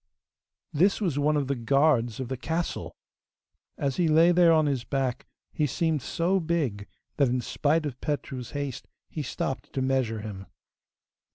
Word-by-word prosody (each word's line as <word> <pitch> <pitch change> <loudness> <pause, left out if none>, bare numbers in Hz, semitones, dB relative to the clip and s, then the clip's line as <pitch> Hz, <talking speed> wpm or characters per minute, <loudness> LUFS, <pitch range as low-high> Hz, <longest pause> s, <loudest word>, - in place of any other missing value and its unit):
This 190 +7 +3
was 170 -9 0
one 150 +1 +2
of 145 - 0
the 140 - 0
guards 125 -2 +2
of 130 - -3
the 130 - -3
castle! 165 +6 -3 0.8
As 135 -2 -1
he 175 - +2
lay 160 +3 +5
there 175 -1 +5
on 155 -1 +4
his 135 -4 0
back, 135 -3 -2 0.3
he 150 - +1
seemed 160 +1 0
so 175 +8 0
big 150 - -1 0.3
that 140 - +4
in 125 +1 0
spite 155 +5 0
of 130 -4 -5
Petru's 135 -4 -3
haste 140 -3 -4 0.2
he 155 - -3
stopped 130 -2 -4
to 135 - -1
measure 130 -5 0
him. 100 -3 -7
140 Hz, 165 wpm, -27 LUFS, 125-160 Hz, 0.8 s, lay